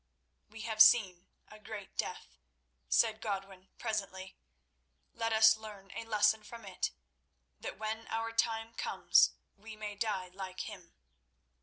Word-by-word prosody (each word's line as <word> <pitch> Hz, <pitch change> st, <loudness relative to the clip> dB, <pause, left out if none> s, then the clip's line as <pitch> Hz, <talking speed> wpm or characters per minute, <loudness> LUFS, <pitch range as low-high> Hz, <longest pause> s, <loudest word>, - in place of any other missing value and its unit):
"We 220 Hz, +1 st, -10 dB
have 220 Hz, -1 st, +1 dB
seen 190 Hz, -6 st, +6 dB, 0.2 s
a 215 Hz, -, -14 dB
great 210 Hz, -2 st, -9 dB
death," -, -, -5 dB, 0.5 s
said 220 Hz, -1 st, +3 dB
Godwin 195 Hz, -2 st, -5 dB
presently. 195 Hz, -4 st, -4 dB, 0.8 s
"Let 225 Hz, 0 st, -2 dB
us 220 Hz, 0 st, +7 dB
learn 210 Hz, -3 st, -11 dB
a 230 Hz, -, -6 dB
lesson 215 Hz, 0 st, +3 dB
from 230 Hz, +1 st, -11 dB
it, 190 Hz, -, -2 dB, 0.7 s
that -, -, -6 dB
when 220 Hz, +1 st, -4 dB
our 225 Hz, 0 st, -2 dB
time 225 Hz, 0 st, 0 dB
comes -, -, +3 dB, 0.2 s
we 215 Hz, +2 st, -11 dB
may 210 Hz, -1 st, -5 dB
die 200 Hz, -3 st, -2 dB
like 185 Hz, 0 st, -7 dB
him." 180 Hz, -3 st, -9 dB
215 Hz, 135 wpm, -33 LUFS, 195-225 Hz, 0.8 s, us